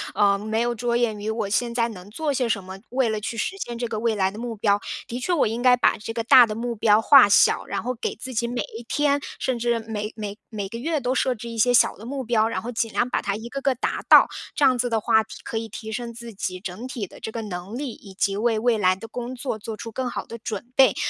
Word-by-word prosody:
呃， 200 -1 +3
没 220 +2 -2
有 240 0 +1
着 235 +1 0
眼 225 -3 0
于 210 +1 -3
我 220 -2 -1
现 235 +3 0
在 235 -1 +2
能 190 -3 -10
做 295 +6 -2
些 250 -3 0
什 200 -4 0
么， 190 +1 -9
为 255 -2 +1
了 215 -1 -2
去 225 +2 -4
实 375 - -2
现 240 -8 -5
这 240 0 -2
个 220 -2 -3
未 230 -1 +1
来 190 -2 +1
的 210 - -9
目 235 -1 -4
标。 205 -1 +2 0.3
的 240 - -4
确 360 - -2
我 340 - +3
应 225 +3 -2
该 250 -1 +6
把 - - +3
这 225 - -6
个 230 0 -2
大 240 +1 +8
的 215 - -4
目 235 +1 -3
标 210 0 +4
化 255 -2 +7
小， 200 - +5
然 - - -3
后 250 +2 -1
给 235 - -4
自 255 +3 -8
己 235 +1 0
每 245 +1 -2
一 225 - -6
天 285 -1 +2 0.2
甚 255 -2 -1
至 235 0 +1
每 220 -1 -5
每 210 -1 -6
每 205 -3 -4
个 230 +4 -7
月 310 +3 -1
都 250 0 -1
设 260 -1 +1
置 235 +1 -8
一 230 - -6
些 245 +3 +4
小 - - +4
的 220 - -11
目 270 0 -3
标， 225 -2 +2
然 - - -2
后 240 - -4
尽 225 -1 -1
量 245 - +1
把 - - -1
它 200 - -1
一 225 +3 -7
个 275 +1 -5
个 270 -1 +1
达 245 - -2
到， - - +9 0.3
这 290 - +3
样 255 -2 +4
子 245 0 +1
的 225 -1 +1
话 220 +1 +3
提 220 - -10
可 225 - -3
以 225 0 -6
提 220 +1 -7
升 235 +1 -4
自 235 0 -10
己 185 -2 -4
整 190 +6 -6
体 245 -6 -4
的 - - -14
这 220 - -5
个 225 0 -5
能 190 +2 -6
力， 275 -2 -3
以 195 -3 -13
及 195 0 +1
为 225 +2 +1
未 230 0 +2
来 185 -2 +4
的 225 +4 -10
工 245 +2 -6
作 245 -3 -4
做 220 +1 -6
出 230 +1 -7
更 255 +3 -3
好 - - -5
的 230 - -9
准 230 +2 -6
备。 265 -6 +6
230 Hz, 310 characters per minute, -24 LUFS, 215-245 Hz, 0.3 s, 到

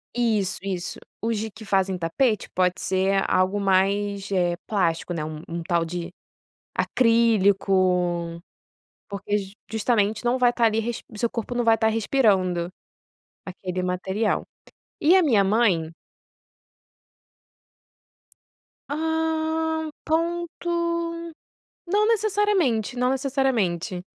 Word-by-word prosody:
isso, 220 -6 +1
isso, 185 -2 -4 0.2
os 225 -1 0 0.2
que 220 -1 -10
fazem 190 -1 +1
tapete 205 +6 0
pode 180 -1 +1
ser 195 +1 +1
algo 185 +2 +2
mais, 200 +1 +1
eh, 175 -2 +1
plástico, 175 -4 0
né, 155 -2 -3
um 160 +2 -6
tal 170 -2 +1
de 175 +1 -5 0.6
acrílico, 190 -7 +2 0.7
porque 200 +1 -2 0.3
justamente 220 -1 +1
não 245 +2 +2
vai 245 -1 +4
estar 240 -1 0
ali 220 0 +1 0.3
o 215 - -11
seu 235 - +1
corpo 230 +1 -4
não 240 -1 0
vai 225 - +5
estar 220 0 +2
respirando 195 -7 +1 0.8
aquele 185 -1 -4
material, 190 +4 -1 0.6
e 330 +5 +5
a 375 - +5
minha 220 -9 +4
mãe 190 -6 +2 3.0
Hã, 320 +1 -1 0.2
ponto, 340 +1 -2 1.2
não 415 +4 +2
necessariamente, 410 - +1
não 250 +1 +1
necessariamente 255 - 0
205 Hz, 105 wpm, -24 LUFS, 185-250 Hz, 3.0 s, vai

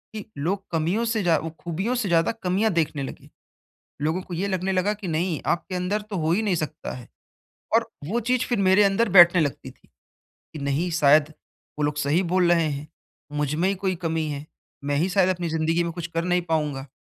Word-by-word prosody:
कि 210 - -6
लोग 190 +7 -1
कमियों 170 +8 0
से 220 -3 0
ज़्या 165 -3 +3
वो 165 - -5
खूबियों 190 +9 -2
से 220 -6 -1
ज़्यादा 165 +2 +3
कमियाँ 195 +4 +1
देखने 150 -4 0
लगे, - - -9 0.7
लोगों 160 +5 0
को 180 - -9
ये 185 +4 -1
लगने 190 0 -1
लगा 190 +3 +1
कि 205 -3 -8
नहीं 165 0 -1 0.2
आपके 185 +2 -8
अंदर 180 +4 -1
तो 195 - -3
हो 160 0 0
ही 200 +6 +2
नहीं 200 -5 +1
सकता 155 +1 -6
है 125 -2 -11 0.7
और - - +2 0.2
वो 235 +3 +1
चीज़ 255 -1 +2
फिर 240 - 0
मेरे 200 +2 +6
अंदर 200 +3 +2
बैठने 175 0 +8
लगती 145 -3 -3
थी - - -27 0.5
कि 155 - -14
नहीं 150 +6 0
शायद 150 +1 +5 0.5
वो - - -1
लोग 150 0 -1
सही 150 +4 +1
बोल 180 -2 +3
रहे 165 -2 +3
हैं, 145 +1 -6 0.4
मुझ 150 0 -1
में 175 +4 +1
ही 200 - +1
कोई 185 -1 +1
कमी 160 -1 -1
है, 145 0 -5 0.4
मैं 145 0 0
ही 170 +6 +1
शायद 185 0 +3
अपनी 175 -1 -3
ज़िंदगी 160 +1 +1
में 170 - -3
कुछ 170 -1 -5
कर 165 +1 0
नहीं 180 0 +1
पाऊँगा, 150 -5 -2
170 Hz, 215 wpm, -24 LUFS, 155-190 Hz, 0.7 s, बैठने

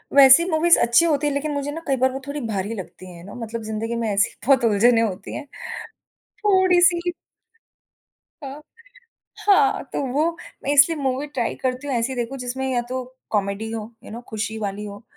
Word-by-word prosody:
वैसी 275 +3 +8
मूवीज़ 335 +1 +4
अच्छी 235 +8 +4
होती 295 -2 +1
है 290 - 0
लेकिन 290 +2 -2
मुझे 285 0 -3
ना 325 +3 -6
कई 275 - +2
बार 260 0 +4
वो 265 - -5
थोड़ी 285 +1 -4
भारी 205 0 -3
लगती 185 -2 -9
है 170 0 -12
ना 200 - -10
मतलब 230 -1 -5
ज़िंदगी 220 +2 -3
में - - -1
ऐसी 200 +1 +2 0.2
बहुत 265 -1 +4
उलझने 225 +2 +4
होती 210 -4 -3
हैं, 295 - -6 1.0
थोड़ी-सी 360 -3 +4 1.3
अ, 275 +2 -7 0.9
हाँ 410 0 +4
तो - - -1
वो 305 +4 +2 0.3
मैं 285 - 0
इसलिए 290 +3 +5
मूवी 270 +1 -1
ट्राई 255 -5 -2
करती 255 +2 -2
हूँ 270 - -1
ऐसी 240 +3 -1
देखो 245 +2 -3
जिसमें 255 +1 -4
या 240 - +1
तो 255 0 -3 0.3
कॉमेडी 205 +1 -1
हो, 225 0 -6
यू - - -11
नौ 235 +2 -7
खुशी 220 0 -4
वाली 205 0 -4
हो 205 +1 -9
260 Hz, 185 wpm, -22 LUFS, 220-290 Hz, 1.3 s, वैसी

